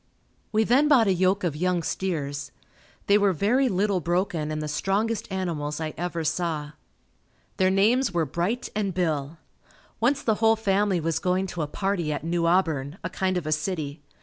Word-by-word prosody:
We 220 Hz, 0 st, +3 dB
then 260 Hz, +7 st, +4 dB
bought 265 Hz, -6 st, +5 dB
a 195 Hz, -, +3 dB
yoke 185 Hz, +2 st, +1 dB
of 165 Hz, -5 st, -1 dB
young 180 Hz, +1 st, 0 dB
steers. 145 Hz, -6 st, -3 dB, 0.5 s
They 205 Hz, +1 st, +4 dB
were 200 Hz, -2 st, +3 dB
very 245 Hz, -, +2 dB
little 195 Hz, -1 st, +1 dB
broken 175 Hz, -2 st, -1 dB
and 155 Hz, 0 st, -3 dB
the 155 Hz, -, -3 dB
strongest 200 Hz, +8 st, -1 dB
animals 165 Hz, -6 st, -3 dB
I 155 Hz, -1 st, -3 dB
ever 170 Hz, 0 st, -3 dB
saw. 155 Hz, -2 st, -2 dB, 0.9 s
Their 185 Hz, 0 st, +3 dB
names 215 Hz, +6 st, +3 dB
were 170 Hz, -3 st, +1 dB
Bright 175 Hz, -, -2 dB
and 200 Hz, -4 st, -1 dB
Bill. 160 Hz, -4 st, -1 dB, 0.6 s
Once 265 Hz, +6 st, +1 dB
the 220 Hz, -, +2 dB
whole 225 Hz, 0 st, +5 dB
family 200 Hz, -3 st, +1 dB
was 165 Hz, -1 st, -1 dB
going 185 Hz, +1 st, 0 dB
to 170 Hz, -, -3 dB
a 150 Hz, -, -1 dB
party 180 Hz, -1 st, -1 dB
at 145 Hz, -, -3 dB
New 170 Hz, 0 st, 0 dB
Auburn, 160 Hz, -4 st, +1 dB
a -, -, -4 dB
kind 185 Hz, -1 st, 0 dB
of 175 Hz, -, -3 dB
a 155 Hz, -, -2 dB
city. 155 Hz, -2 st, -2 dB
180 Hz, 180 wpm, -25 LUFS, 155-200 Hz, 0.9 s, bought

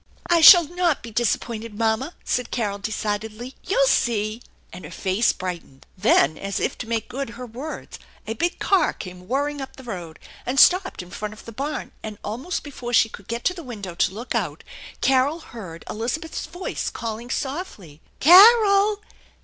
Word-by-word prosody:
"I 345 Hz, -1 st, +3 dB
shall 345 Hz, +2 st, +11 dB
not 345 Hz, -1 st, -1 dB
be 235 Hz, -, -8 dB
disappointed, 225 Hz, -1 st, -2 dB
mamma," 230 Hz, +8 st, 0 dB
said 250 Hz, -1 st, -1 dB
Carol 205 Hz, -4 st, -2 dB
de 215 Hz, +2 st, -4 dB
cidedly. 215 Hz, +4 st, -4 dB
" -, -, -36 dB
You'll -, -, +2 dB
see! 225 Hz, -, +1 dB, 0.2 s
" -, -, -26 dB
and 180 Hz, +1 st, -9 dB
her -, -, -8 dB
face 195 Hz, +4 st, +1 dB
brightened. 175 Hz, -7 st, -7 dB
Then 155 Hz, -7 st, +3 dB
as 195 Hz, 0 st, -3 dB
if -, -, -1 dB
to 230 Hz, -, -6 dB
make 225 Hz, -1 st, -1 dB
good 265 Hz, +1 st, -5 dB
her 250 Hz, -, -6 dB
words 255 Hz, +7 st, -8 dB, 0.3 s
a 220 Hz, -, -3 dB
big 345 Hz, +10 st, -1 dB
car 380 Hz, -5 st, +2 dB
came 180 Hz, -1 st, -10 dB
whirring 285 Hz, +3 st, -1 dB
up 270 Hz, -, -8 dB
the 265 Hz, -, -12 dB
road 175 Hz, -9 st, -7 dB, 0.3 s
and 265 Hz, +2 st, 0 dB
stopped 365 Hz, -, +4 dB
in 180 Hz, -, -15 dB
front 210 Hz, 0 st, -5 dB
of -, -, -15 dB
the 230 Hz, -, -8 dB
barn, 280 Hz, +6 st, -4 dB
and 215 Hz, -1 st, -7 dB
almost 255 Hz, -, -4 dB
before 250 Hz, -4 st, -7 dB
she 225 Hz, -, +5 dB
could 195 Hz, -, -12 dB
get 235 Hz, +1 st, -4 dB
to 365 Hz, -, +1 dB
the 355 Hz, -, -8 dB
window 210 Hz, -, -7 dB
to 175 Hz, -, +1 dB
look 230 Hz, +6 st, -6 dB
out -, -, -2 dB, 0.4 s
Carol 270 Hz, +5 st, +2 dB
heard 195 Hz, -, -10 dB
Elizabeth's 255 Hz, +11 st, -4 dB
voice 350 Hz, +4 st, -4 dB
calling 230 Hz, +1 st, -6 dB
softly: 255 Hz, -, -5 dB, 0.2 s
"Carol! 405 Hz, -, +7 dB
240 Hz, 185 wpm, -23 LUFS, 210-305 Hz, 0.4 s, shall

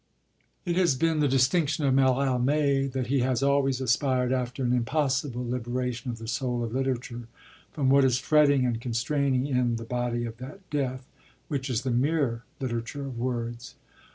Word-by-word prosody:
It 175 Hz, -1 st, 0 dB
has 175 Hz, -7 st, +3 dB
been 160 Hz, +3 st, +1 dB
the 150 Hz, -, +3 dB
distinction 145 Hz, +3 st, +2 dB
of 135 Hz, -, +3 dB
Mallarmé 135 Hz, +1 st, +2 dB
that 130 Hz, -1 st, -2 dB
he 135 Hz, +3 st, +1 dB
has 130 Hz, +1 st, +1 dB
always 140 Hz, -2 st, +2 dB
aspired 130 Hz, 0 st, +1 dB
after 125 Hz, +1 st, -2 dB
an 125 Hz, 0 st, +1 dB
impossible 130 Hz, 0 st, 0 dB
liberation 125 Hz, 0 st, -3 dB
of 120 Hz, -, -4 dB
the 115 Hz, 0 st, -8 dB
soul 125 Hz, 0 st, -1 dB
of 115 Hz, -1 st, -4 dB
literature 125 Hz, -3 st, -3 dB, 0.4 s
from 145 Hz, -5 st, -1 dB
what 140 Hz, +1 st, +5 dB
is 130 Hz, -2 st, +3 dB
fretting 145 Hz, -2 st, +3 dB
and 115 Hz, -2 st, -1 dB
constraining 130 Hz, +2 st, 0 dB
in 125 Hz, -4 st, +1 dB
'the 115 Hz, 0 st, -5 dB
body 120 Hz, 0 st, -2 dB
of 115 Hz, -1 st, -7 dB
that 150 Hz, +10 st, -10 dB
death,' 130 Hz, -3 st, -2 dB, 0.4 s
which 135 Hz, -3 st, -2 dB
is 120 Hz, -4 st, -1 dB
the 130 Hz, -, -1 dB
mere 130 Hz, -2 st, +1 dB, 0.2 s
literature 125 Hz, +2 st, -4 dB
of 130 Hz, -4 st, -6 dB
words. 120 Hz, -1 st, -4 dB
130 Hz, 170 wpm, -27 LUFS, 120-140 Hz, 0.4 s, what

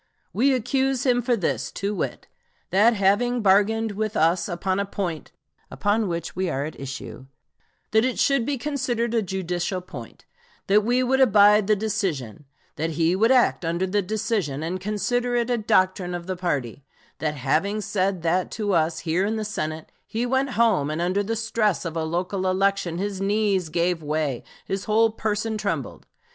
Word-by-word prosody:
We 270 Hz, +5 st, +3 dB
accuse 265 Hz, +2 st, 0 dB
him 245 Hz, -2 st, +3 dB
for 240 Hz, 0 st, +1 dB
this, 185 Hz, -, -2 dB
to 200 Hz, +2 st, -2 dB
wit: 200 Hz, -, -4 dB, 0.5 s
that 220 Hz, +5 st, +5 dB
having 220 Hz, +5 st, +2 dB
bargained 210 Hz, +3 st, +3 dB
with 215 Hz, +1 st, -2 dB
us 170 Hz, +4 st, +2 dB
upon 185 Hz, +2 st, -1 dB
a 200 Hz, -, 0 dB
point 175 Hz, -6 st, -4 dB, 0.4 s
upon 210 Hz, +1 st, 0 dB
which 170 Hz, -2 st, -4 dB
we 185 Hz, +1 st, -1 dB
were 140 Hz, -4 st, -1 dB
at 155 Hz, -, -8 dB
issue, 135 Hz, -1 st, -7 dB, 0.6 s
that 220 Hz, +1 st, +4 dB
it 255 Hz, -1 st, 0 dB
should 275 Hz, -3 st, +3 dB
be 280 Hz, +3 st, -1 dB
considered 245 Hz, -4 st, -2 dB
a 230 Hz, -, +2 dB
judicial 185 Hz, -1 st, -2 dB
point; 135 Hz, -10 st, -11 dB, 0.4 s
that 205 Hz, +2 st, +4 dB
he 250 Hz, +1 st, +3 dB
would 265 Hz, +1 st, +2 dB
abide 210 Hz, -3 st, +6 dB
the 215 Hz, -, +4 dB
decision; 180 Hz, -, -3 dB, 0.3 s
that 160 Hz, +2 st, -1 dB
he 165 Hz, +2 st, +3 dB
would 220 Hz, +4 st, +3 dB
act 250 Hz, -7 st, +3 dB
under 170 Hz, +3 st, 0 dB
the 205 Hz, +2 st, 0 dB
decision, 200 Hz, -, -2 dB
and 180 Hz, +3 st, -3 dB
consider 240 Hz, +5 st, -1 dB
it 240 Hz, 0 st, 0 dB
a 240 Hz, -, +2 dB
doctrine 185 Hz, -3 st, +1 dB
of 175 Hz, -1 st, -6 dB
the 185 Hz, 0 st, -3 dB
party; 145 Hz, -, -3 dB, 0.4 s
that 150 Hz, -1 st, -1 dB
having 155 Hz, +10 st, 0 dB
said 190 Hz, -3 st, -1 dB
that 180 Hz, +2 st, +1 dB
to 210 Hz, -3 st, -2 dB
us 165 Hz, -1 st, +1 dB
here 170 Hz, +3 st, 0 dB
in 215 Hz, +2 st, 0 dB
the 215 Hz, -1 st, -3 dB
Senate, 155 Hz, -6 st, -4 dB, 0.2 s
he 230 Hz, +2 st, -2 dB
went 265 Hz, +1 st, 0 dB
home, 210 Hz, -11 st, +3 dB
and 155 Hz, +1 st, -3 dB
under 180 Hz, +4 st, +1 dB
the 220 Hz, +3 st, -2 dB
stress 215 Hz, -4 st, 0 dB
of 165 Hz, -1 st, -4 dB
a 165 Hz, -, -1 dB
local 180 Hz, +4 st, -2 dB
election, 190 Hz, -2 st, +1 dB
his 195 Hz, 0 st, -3 dB
knees 200 Hz, -3 st, +1 dB
gave 170 Hz, +1 st, 0 dB
way; 150 Hz, -4 st, -2 dB, 0.2 s
his 195 Hz, 0 st, -3 dB
whole 220 Hz, +1 st, +3 dB
person 220 Hz, 0 st, -2 dB
trembled. 200 Hz, 0 st, -4 dB
200 Hz, 180 wpm, -24 LUFS, 170-220 Hz, 0.6 s, abide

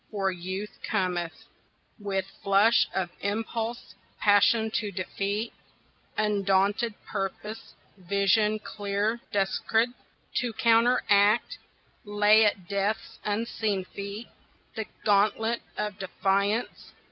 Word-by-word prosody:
For 195 Hz, -2 st, 0 dB
Youth 185 Hz, +3 st, -6 dB
cometh 180 Hz, -5 st, -2 dB, 0.6 s
With 195 Hz, -2 st, -2 dB, 0.2 s
flush 205 Hz, +3 st, +4 dB
of 180 Hz, -2 st, -1 dB
impulse, 225 Hz, +3 st, -3 dB, 0.3 s
passion 210 Hz, +2 st, +4 dB
to 215 Hz, -1 st, -1 dB
defeat, 200 Hz, +4 st, -3 dB, 0.6 s
Undaunted 205 Hz, +1 st, +1 dB
purpose, 210 Hz, +2 st, -5 dB, 0.2 s
vision 200 Hz, +3 st, +2 dB
clear 210 Hz, +1 st, -2 dB
descried, 220 Hz, +4 st, +1 dB, 0.5 s
To 245 Hz, -3 st, 0 dB
counteract, 225 Hz, -2 st, +3 dB, 0.4 s
lay 210 Hz, +1 st, +5 dB
at 195 Hz, -4 st, 0 dB
Death's 200 Hz, +3 st, -2 dB
unseen 210 Hz, -2 st, -1 dB
feet 200 Hz, +4 st, -7 dB, 0.5 s
The 220 Hz, -2 st, -4 dB, 0.2 s
gauntlet 215 Hz, +3 st, +2 dB, 0.2 s
of 210 Hz, -1 st, -3 dB
defiance. 200 Hz, +4 st, -1 dB
205 Hz, 90 wpm, -27 LUFS, 195-220 Hz, 0.6 s, lay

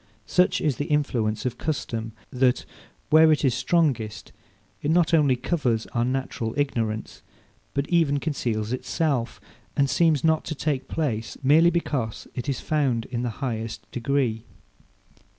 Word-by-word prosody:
Such 180 Hz, 0 st, +2 dB
is 145 Hz, -5 st, 0 dB
the 145 Hz, -, -2 dB
influence 120 Hz, -8 st, 0 dB
of 125 Hz, -, -2 dB
custom, 115 Hz, -7 st, -3 dB, 0.2 s
that, 125 Hz, -1 st, +2 dB, 0.5 s
where 160 Hz, +1 st, +7 dB
it 150 Hz, -1 st, +2 dB
is 130 Hz, -, +3 dB
strongest, 130 Hz, -5 st, 0 dB, 0.5 s
it 145 Hz, -, -1 dB
not 170 Hz, +1 st, +3 dB
only 145 Hz, -5 st, +5 dB
covers 125 Hz, -4 st, 0 dB
our 120 Hz, -, +1 dB
natural 125 Hz, -3 st, -2 dB
ignorance, 115 Hz, -6 st, -2 dB, 0.5 s
but 140 Hz, +1 st, 0 dB
even 160 Hz, -5 st, +2 dB
conceals 120 Hz, -7 st, -2 dB
itself, 130 Hz, -2 st, -1 dB, 0.4 s
and 140 Hz, -, +4 dB
seems 150 Hz, +1 st, +2 dB
not 160 Hz, -1 st, +3 dB
to 155 Hz, -, -4 dB
take 145 Hz, -2 st, -2 dB
place, 120 Hz, -9 st, -2 dB
merely 155 Hz, +5 st, +6 dB
because 140 Hz, -10 st, -2 dB
it 125 Hz, +3 st, -4 dB
is 135 Hz, -, -1 dB
found 135 Hz, -7 st, 0 dB
in 120 Hz, -2 st, -2 dB
the 125 Hz, -, -1 dB, 0.2 s
highest 115 Hz, -2 st, -4 dB
degree. 120 Hz, -3 st, 0 dB
135 Hz, 145 wpm, -25 LUFS, 115-155 Hz, 0.5 s, where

